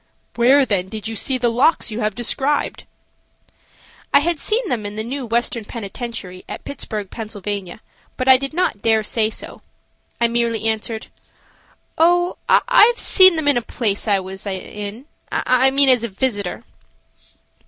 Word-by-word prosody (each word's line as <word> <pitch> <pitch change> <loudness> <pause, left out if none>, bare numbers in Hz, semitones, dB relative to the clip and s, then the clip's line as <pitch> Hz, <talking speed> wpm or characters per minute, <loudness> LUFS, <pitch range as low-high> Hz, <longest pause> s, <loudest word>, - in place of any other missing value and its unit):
"Where 260 +4 +4
then 190 -5 -1
did 220 0 -6
you 225 - -5
see 260 +4 0
the 240 -1 0
locks 245 +1 +2
you 215 - -4
have 215 -2 -1
described?" 270 +4 -1 1.3
I 280 - +5
had 335 0 -1
seen 445 - -1
them 240 -5 -2
in 205 0 -6
the 220 - -3
new 255 +2 -5
Western 235 0 -1
Penitentiary 210 -3 -7
at - - -7
Pittsburg, 215 -7 -6
Pa., 225 - -6 0.9
but 255 - -3
I 260 - +9
did 275 +1 -2
not 335 - -1
dare 220 -1 +2
say 215 0 +1
so. - - -10 0.6
I 235 - +4
merely 235 -1 -1
answered: 220 0 -2 0.9
"Oh, 350 +2 +3
I - - +6
have 480 0 0
seen 375 -2 +7
them 315 -2 -1
in 285 -3 +4
a - - +1
place 225 -3 -3
I 200 -2 +3
was 190 +2 -7
in–I 215 - -2
mean 275 +1 +3
as 250 -3 +5
a - - -1
visitor." 205 -1 -2
235 Hz, 160 wpm, -20 LUFS, 215-275 Hz, 1.3 s, I